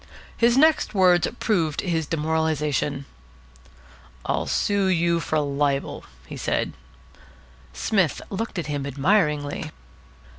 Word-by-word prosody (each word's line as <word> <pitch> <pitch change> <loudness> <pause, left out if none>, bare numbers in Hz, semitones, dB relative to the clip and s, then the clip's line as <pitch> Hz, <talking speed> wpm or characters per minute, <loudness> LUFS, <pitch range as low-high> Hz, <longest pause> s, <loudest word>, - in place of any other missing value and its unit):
His 235 +1 +3
next 310 -5 +3
words 180 -3 +4
proved 165 -9 0
his 165 -4 -1
demoralisation. 150 -3 -1 1.2
"I'll - - -1
sue 200 -2 +1
you 170 -2 +2
for 155 -1 -1
libel," 140 -1 -1 0.3
said - - -1 1.0
he. - - -13
Psmith 190 -9 +1
looked 205 +1 -4
at 170 - -2
him 145 -2 -3
admiringly. 150 0 0
160 Hz, 105 wpm, -24 LUFS, 145-190 Hz, 1.2 s, words